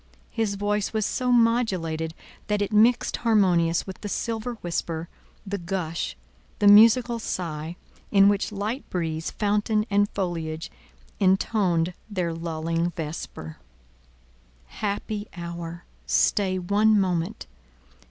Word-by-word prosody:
His 215 -3 -1
voice 205 +1 -1
was 215 -2 0
so 250 +2 0
modulated 185 -10 +1 0.3
that 210 -1 +1
it 205 +1 -2
mixed 230 +3 +4
harmonious 180 -7 +2
with 190 - -9
the 205 - -5
silver 230 +3 -3
whisper, 165 -1 -3 0.4
the 200 0 -3
gush, 170 -2 -3 0.4
the 205 - +3
musical 230 +3 +7
sigh, 165 -5 -4 0.3
in 195 0 +6
which 205 0 +1
light 210 +6 -3
breeze, 160 -2 -2
fountain 210 +1 0
and 205 0 +3
foliage 165 -4 -3 0.5
intoned 185 -3 +2 0.2
their 180 -5 -2
lulling 165 +1 -2
vesper: 150 - -6 1.1
Happy 205 - -4
hour—stay 170 +3 -1
one 205 +4 +3
moment! 185 +2 -1
195 Hz, 110 wpm, -25 LUFS, 170-210 Hz, 1.1 s, musical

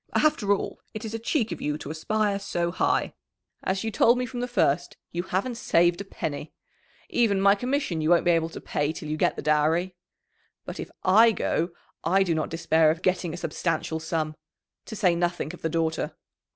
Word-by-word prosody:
After 255 -10 +3
all, 200 - -1
it 215 +1 -5
is 220 - -5
a 225 - -3
cheek 230 0 0
of - - -5
you 150 0 -1
to 155 - -7
aspire 205 +5 0
so 170 -3 -2
high. - - +1 0.5
As 190 +2 -1
you 225 - -2
told 235 +4 +4
me 250 - -1
from 250 0 -6
the 245 - -1
first, 175 - +1
you 170 - -2
haven't 195 +7 -2
saved 175 -1 +3
a - - -4
penny. 155 -6 -5 0.6
Even 220 -5 +2
my 200 +1 +6
commission 245 - -1
you 155 - +1
won't 175 0 +4
be 175 - +5
able 165 -1 +2
to - - -8
pay 145 +1 -1
till 160 - -7
you 155 - -1
get - - +1
the - - -6
dowry. 155 +5 +2 0.7
But - - -7
if - - -5
I 220 +5 +6
go, 170 -5 0 0.3
I 190 +4 +3
do 175 -3 0
not 155 -1 -1
despair 160 -1 +3
of 165 +3 -1
getting 180 -2 +1
a 170 - -6
substantial 160 -1 -2
sum 160 -1 -2 0.5
to 220 - -7
say 185 -4 +3
nothing 175 -1 -1
of 180 - -11
the 160 - -1
daughter." 160 0 -1
175 Hz, 205 wpm, -26 LUFS, 160-210 Hz, 0.7 s, my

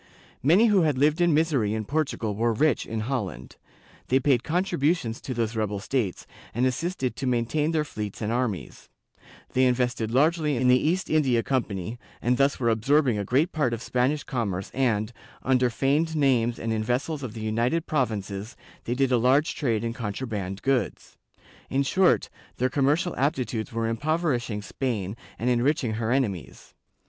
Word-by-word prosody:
Many 175 - +5
who 205 -4 +4
had 150 -5 +1
lived 150 +5 +3
in 175 -1 +4
misery 145 -9 +2
in 110 -1 -3
Portugal 140 -6 -1
were 115 +3 +1
rich 145 +3 +1
in 110 -1 -3
Holland; 105 - -4 0.5
they 130 - +3
paid 130 -3 +2
contributions 155 -7 0
to 130 - -5
those 115 -1 -1
rebel 105 -2 -1
states, 105 -3 -2 0.3
and 125 +2 +2
assisted 130 0 -1
to 135 - -3
maintain 125 +5 +1
their 160 -2 +1
fleets 105 -7 -6
and 110 0 -2
armies; 120 -6 -3 0.6
they 130 - +3
invested 125 -3 0
largely 150 +3 +2
in 125 +1 +2
the 125 +3 +4
East 180 +2 -1
India 130 -7 +2
Com 130 -3 +1
pany, 100 +4 -6 0.2
and 125 +1 +1
thus 140 +1 +2
were 120 -2 +2
absorbing 125 +1 +2
a - - -1
great 140 - +1
part 130 -7 0
of 115 - -9
Spanish 130 +4 0
commerce 100 -8 -3
and, 115 -4 0 0.3
under 125 -1 +3
feigned 145 +7 +1
names 125 -5 +2
and 115 0 -2
in 110 -1 -1
vessels 135 +6 -1
of 120 -4 -6
the 110 - -6
United 115 +9 0
Provinces, 110 -6 -2 0.3
they 120 - -1
did 135 0 +1
a 125 - +4
large 135 +6 +3
trade 115 -6 -1
in 115 0 -2
contraband 105 -4 -4
goods.^ 130 -7 -1 0.5
In 135 +1 +1
short, 185 +6 +2 0.3
their 130 +1 0
commercial 150 +6 +1
aptitudes 125 -5 -1
were 115 0 -1
impoverishing 120 -4 -1
Spain 105 -6 -3 0.2
and 120 - -3
enriching 125 0 +1
her 110 +1 -2
enemies. 100 - -2
125 Hz, 170 wpm, -26 LUFS, 110-145 Hz, 0.6 s, Many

